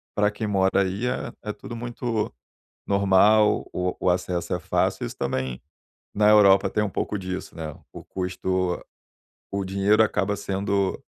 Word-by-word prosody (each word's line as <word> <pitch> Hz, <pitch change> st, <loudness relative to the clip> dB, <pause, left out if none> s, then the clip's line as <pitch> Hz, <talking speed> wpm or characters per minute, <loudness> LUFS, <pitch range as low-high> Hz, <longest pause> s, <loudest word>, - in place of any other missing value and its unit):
pra 105 Hz, 0 st, +2 dB
quem 105 Hz, +1 st, -4 dB
mora 95 Hz, -1 st, +2 dB
aí 95 Hz, +5 st, -1 dB
é 125 Hz, -, -2 dB
é 105 Hz, -1 st, -3 dB
tudo 120 Hz, -, -9 dB
muito 115 Hz, -, -3 dB, 0.5 s
normal, 100 Hz, +2 st, +4 dB
o 90 Hz, 0 st, -1 dB
o -, -, +1 dB
acesso 90 Hz, 0 st, -1 dB
é -, -, -1 dB
fácil, -, -, 0 dB
isso -, -, -7 dB
também 65 Hz, -1 st, -2 dB, 0.5 s
na 105 Hz, 0 st, +4 dB
Europa 100 Hz, -2 st, +6 dB
tem 105 Hz, -, 0 dB
um 105 Hz, -, -1 dB
pouco 105 Hz, -, -2 dB
disso, 95 Hz, -1 st, -6 dB
né, 80 Hz, -2 st, -5 dB, 0.2 s
o -, -, -9 dB
custo 95 Hz, -1 st, -2 dB, 0.7 s
o 100 Hz, -, -1 dB
dinheiro 100 Hz, +3 st, +3 dB
acaba 100 Hz, -2 st, +1 dB
sendo, 100 Hz, -1 st, -1 dB
100 Hz, 155 wpm, -25 LUFS, 95-105 Hz, 0.7 s, Europa